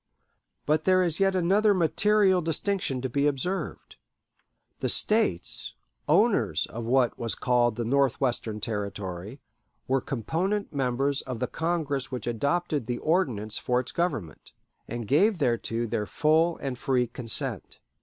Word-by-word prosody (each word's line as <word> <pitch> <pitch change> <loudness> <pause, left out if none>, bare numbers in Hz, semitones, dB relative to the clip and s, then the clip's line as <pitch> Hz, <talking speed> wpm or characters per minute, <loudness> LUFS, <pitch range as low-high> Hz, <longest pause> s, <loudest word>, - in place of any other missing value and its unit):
But 155 +1 +1
there 185 0 +4
is 170 -1 -1
yet 195 -1 +2
another 200 +4 +3
material 190 +2 +3
distinction 165 -4 -1
to - - 0
be 140 +3 +1
observed. 160 +7 -3 0.8
The - - -1
States, 210 - +1 0.3
owners - - +3
of 115 +1 -7
what 125 0 +2
was 115 -3 -1
called 120 -3 +1
the 120 0 -3
Northwestern 125 -4 0
Territory, 105 0 -5 0.5
were 135 0 +1
component 170 - -2
members 135 +1 0
of 130 -2 -6
the 125 - 0
Congress 145 -3 -2
which 125 - -5
adopted 140 +3 -1
the 120 - -2
Ordinance 125 - 0
for 125 0 +1
its 125 - -5
government, 115 - -3 0.3
and 120 -1 -5
gave 190 - +3
thereto 120 -4 -1
their 105 -2 -2
full 160 +2 +2
and 130 -3 -5
free 125 -2 +1
consent. 115 -1 0
135 Hz, 135 wpm, -27 LUFS, 120-170 Hz, 0.8 s, there